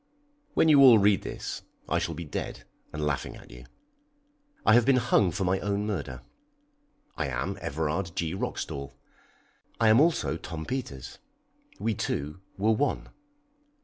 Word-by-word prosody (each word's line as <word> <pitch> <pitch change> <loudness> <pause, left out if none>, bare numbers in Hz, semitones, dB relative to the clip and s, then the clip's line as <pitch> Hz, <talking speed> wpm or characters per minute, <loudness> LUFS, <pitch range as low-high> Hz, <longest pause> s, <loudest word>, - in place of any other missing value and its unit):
When - - +4
you 145 -3 +7
all 125 -4 +9
read 100 -1 +4
this - - -5 0.3
I - - +1
shall - - -3
be 85 - -6
dead 75 - -5 0.3
and 75 -1 -3
laughing 75 -2 -2
at - - -14
you. - - -12 1.0
I 110 - +6
have 120 +1 +6
been 135 +2 +4
hung 110 -6 +3
for 95 +4 -2
my 95 +1 +1
own 100 0 -1
murder. 75 -11 -4 0.9
I 75 - -1
am 65 +9 -2
Everard 80 +2 -2
G. 85 -1 -1
Roxdal. 70 -7 -4 0.8
I 115 -1 +5
am 110 +5 +6
also 160 - +2
Tom 80 -2 -6
Peters. 115 - -5 0.6
We 115 - 0
two 75 -2 -3 0.2
were 105 +3 +2
one. 135 +6 0
95 Hz, 150 wpm, -28 LUFS, 75-110 Hz, 1.0 s, all